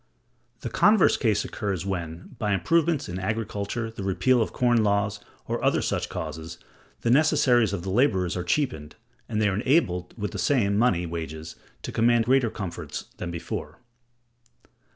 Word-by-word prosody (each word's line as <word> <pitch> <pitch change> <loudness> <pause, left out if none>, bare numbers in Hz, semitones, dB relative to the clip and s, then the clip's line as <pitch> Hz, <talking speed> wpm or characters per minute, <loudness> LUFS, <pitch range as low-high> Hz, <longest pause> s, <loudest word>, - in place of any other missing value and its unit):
The 120 - -4
converse 205 - +5
case 110 -6 +1
occurs 95 -3 -3
when, 85 -3 -5
by 105 -3 0
improvements 165 - +1
in 90 +1 -5
agriculture, 110 +2 -3
the 110 - -8
repeal 115 +6 +2
of 110 - -1
corn 120 -3 +2
laws, 100 0 +1 0.3
or - - -2
other - - +2
such - - -1
causes, 80 +1 -6 0.4
the 115 - +1
necessaries 125 -6 +4
of 95 -4 -3
the 95 - -3
laborers 95 -6 +2
are 90 - -2
cheapened, 85 - -1 0.3
and 105 -2 -1
they 110 - +3
are 100 - +1
enabled 105 - +1
with 105 -2 -3
the - - -5
same 110 -8 +2
[money] 100 -6 +2
wages 80 -1 -6 0.3
to - - -5
command 115 0 +3
greater 130 -1 +3
comforts 95 -6 -6
than 90 - -5
before. 85 -2 -5
105 Hz, 160 wpm, -26 LUFS, 90-120 Hz, 0.4 s, converse